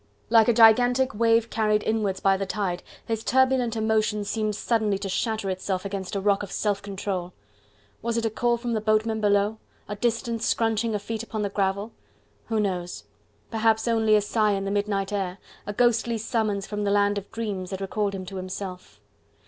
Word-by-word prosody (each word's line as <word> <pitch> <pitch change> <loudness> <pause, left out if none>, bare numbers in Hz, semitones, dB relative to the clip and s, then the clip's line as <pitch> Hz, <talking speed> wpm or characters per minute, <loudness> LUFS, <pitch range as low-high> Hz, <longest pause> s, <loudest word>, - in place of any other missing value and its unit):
Like 225 -2 +6
a 240 - +5
gigantic 245 +4 +5
wave 230 +1 +2
carried 215 -1 +1
inwards 210 -4 0
by 195 0 +3
the 195 0 -3
tide, 190 -4 -2 0.2
his 225 -1 -2
turbulent 260 -2 +2
emotion 220 -1 +1
seemed 215 0 -1
suddenly 215 -3 +1
to 195 0 -5
shatter 220 +2 -1
itself 185 0 -3
against 195 -1 -4
a - - +1
rock 200 0 +2
of 200 - -7
self 205 -2 -1
control. 190 -2 -4 0.7
Was 235 +1 -1
it 230 - 0
a 225 - 0
call 240 +2 +1
from 235 0 -3
the 220 - 0
boatmen 220 +1 +1
below? 205 +1 +2 0.3
a 205 - -4
distant 230 +1 -1
scrunching 225 -1 +1
of 205 - -3
feet 225 0 -3
upon 220 -2 -4
the 200 - -1
gravel? 200 +2 -1 0.6
who 225 -1 0
knows, 180 -4 -2 0.5
perhaps 220 0 +2
only 220 -2 +3
a 210 - +4
sigh 210 0 +1
in 195 0 -2
the 195 - -2
midnight 200 -1 -1
air, 190 -2 -2 0.3
a 205 - -3
ghostly 235 0 +2
summons 215 -3 -1
from 210 -1 -4
the 200 - +1
land 205 0 +2
of 200 - -16
dreams 200 -5 -4
that 190 - -4
recalled 200 +1 -2
him 185 -1 -6
to 190 +1 -7
himself. 185 - -7
210 Hz, 190 wpm, -25 LUFS, 195-225 Hz, 0.7 s, Like